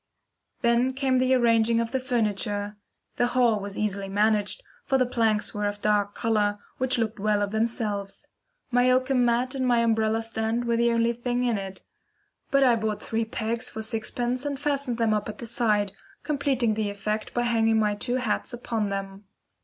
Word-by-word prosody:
Then 235 +2 +3
came 265 -1 +1
the 255 +1 +3
arranging 230 -1 +3
of 230 0 -2
the 265 - 0
furniture. 210 -4 -1 0.4
The 245 - +3
hall 235 -4 +4
was 200 0 -5
easily 200 -2 -2
managed, 210 - +1 0.2
for 270 - +1
the 255 - +3
planks 225 -3 0
were 210 0 -1
of 205 - -2
a - - -29
dark 205 -1 +1
colour, 210 -2 +1 0.2
which 255 -1 +1
looked 225 -2 -2
well 210 0 +1
of 200 - -3
themselves. 220 -3 -2 0.4
My 245 +1 +4
oakum 255 0 +3
mat 240 +2 +1
and 265 -1 -2
my 240 -1 +3
umbrella 225 -1 +1
stand 225 +1 -2
were 235 0 +1
the 235 0 +3
only 230 0 +2
things 245 +1 -1
in 230 -4 +1
it; 190 -1 -7 0.7
but 275 0 +4
I 245 -3 +5
bought 215 -1 -2
three 225 0 -2
pegs 230 +2 -3
for 220 - -5
sixpence, 240 +3 -2
and 285 -2 -3
fastened 280 -4 0
them 225 -2 +2
up 210 0 -1
at 210 - -7
the - - -7
side, 215 -3 +1 0.3
completing 275 -6 +1
the 215 -1 -1
effect 210 +2 -4
by 240 - +1
hanging 225 -2 +2
my 210 -1 +2
two 245 +4 -2
hats 250 -1 -1
upon 225 -3 -2
them. 195 0 -5
225 Hz, 190 wpm, -26 LUFS, 210-245 Hz, 0.7 s, I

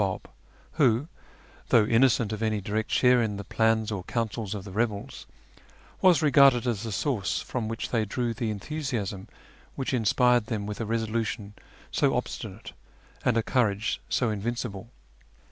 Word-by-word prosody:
ll), 95 -2 0 0.6
nvIki, 130 0 +3 0.6
though 110 -3 +5
innocent 115 -1 +3
of 110 - -5
any 110 -1 0
direct 110 +2 -2
share 125 -1 +4
in 105 -3 -1
the 100 - -5
plans 110 +1 +1
or 100 -4 -3
councils 110 -3 -3
of 100 - -6
the 95 - -9
rebels, 105 0 -3 0.7
was 175 -4 +5
regarded 140 -4 +5
as 115 -4 -1
tlie 115 - -4
source 95 - -1
from 110 +7 -4
which 115 0 -4
they 115 -3 +2
drew 115 +3 -2
the 115 0 -2
enthusiasm 110 -4 -4 0.5
wliich 135 0 -2
in 120 -3 +1
spired 125 +1 +3
them 105 -3 -3
with 105 +2 -5
a 110 - -3
resolution 110 -2 -2 0.4
so - - +2
obstinate - - -5 0.5
and 120 -2 +2
a 115 - +2
courage 110 -4 0
so 120 -3 +1
invincible. 115 0 -4
110 Hz, 160 wpm, -27 LUFS, 105-120 Hz, 0.7 s, though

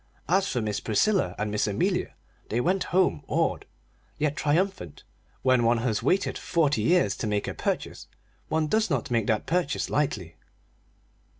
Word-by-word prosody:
As 190 +2 +2
for 120 - -1
Miss 105 -1 -2
Priscilla 180 - +1
and 105 0 -2
Miss 105 0 0
Amelia, 100 - -1 0.3
they 115 - 0
went 185 +8 +1
home 180 - +2
awed, - - 0 0.5
yet 150 -1 0
triumphant: 155 - -1 0.4
when 130 -2 +4
one 115 +1 +3
has 115 -2 -1
waited 190 - +1
forty 150 -4 +1
years 180 +1 +3
to 110 - -3
make 105 -1 -1
a - - -3
purchase - - -3 0.4
one 160 0 +1
does 215 +7 +1
not 135 -5 -1
make 115 -3 +1
that 110 -1 +1
purchase 170 -3 -1
lightly. 105 - -1
140 Hz, 160 wpm, -26 LUFS, 110-175 Hz, 0.5 s, when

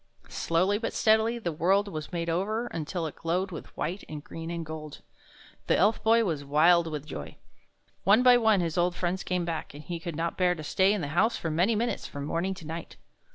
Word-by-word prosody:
Slowly 185 +5 +1
but 230 - -3
steadily 220 +2 +3
the 180 -8 -3
world 190 +6 +2
was 155 -5 -6
made 170 -1 -3
over, 200 +8 -1
until 165 -3 -4
it 155 - -5
glowed 180 +3 -1
with 165 - -7
white 180 +6 -3
and 150 -1 -7
green 165 +1 -7
and 170 -1 -4
gold. 155 -1 -8 0.6
The - - +3
Elf 215 - +3
Boy 230 +1 +5
was 155 -6 -2
wild 165 +4 +4
with 150 -2 -5
joy. 75 - -7 0.7
One 210 +6 +5
by 250 -1 +8
one 220 -5 +3
his 165 0 -1
old 175 0 +1
friends 180 +1 -1
came 180 -1 -1
back, 165 -3 -4
and 150 - -9
he 170 +2 -5
could 165 -1 -5
not 165 +2 -2
bear 180 -1 +3
to 155 - -8
stay 190 +5 +3
in 210 -2 0
the 145 - -3
house 220 +10 +2
for 165 - -3
many 180 +8 +2
minutes 235 +3 -1
from 140 0 -6
morning 175 +5 -1
to 170 - -11
night. 165 +2 -7
175 Hz, 220 wpm, -28 LUFS, 160-200 Hz, 0.7 s, by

